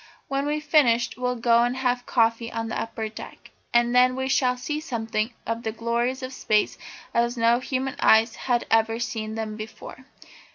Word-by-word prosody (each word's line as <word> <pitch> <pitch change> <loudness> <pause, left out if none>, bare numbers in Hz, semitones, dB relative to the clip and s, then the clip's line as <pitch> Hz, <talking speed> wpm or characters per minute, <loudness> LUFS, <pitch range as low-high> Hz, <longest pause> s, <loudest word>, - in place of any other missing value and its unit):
When 275 +1 -1
we've 300 +1 -1
finished 250 -6 +3
we'll 250 0 -1
go 235 0 +3
and 245 +2 0
have 250 -1 -1
coffee 230 0 +1
on 225 0 -3
the - - -2
upper 225 -1 -4
deck, 215 - -11 0.2
and 240 0 +3
then 250 0 +5
we 265 0 -2
shall 250 -2 +2
see 300 +4 -3
something 225 -5 -2
of 230 +1 -2
the 220 - -3
glories 235 +4 -1
of 255 +1 -5
Space 215 -4 +1 0.4
as 235 +1 +1
no 230 +1 +3
human 260 +1 -3
eyes 225 +1 +4
have 245 -2 0
ever 225 0 +3
seen 220 -2 -4
them 220 -1 -4
before." 220 +4 -9
235 Hz, 180 wpm, -25 LUFS, 225-255 Hz, 0.4 s, then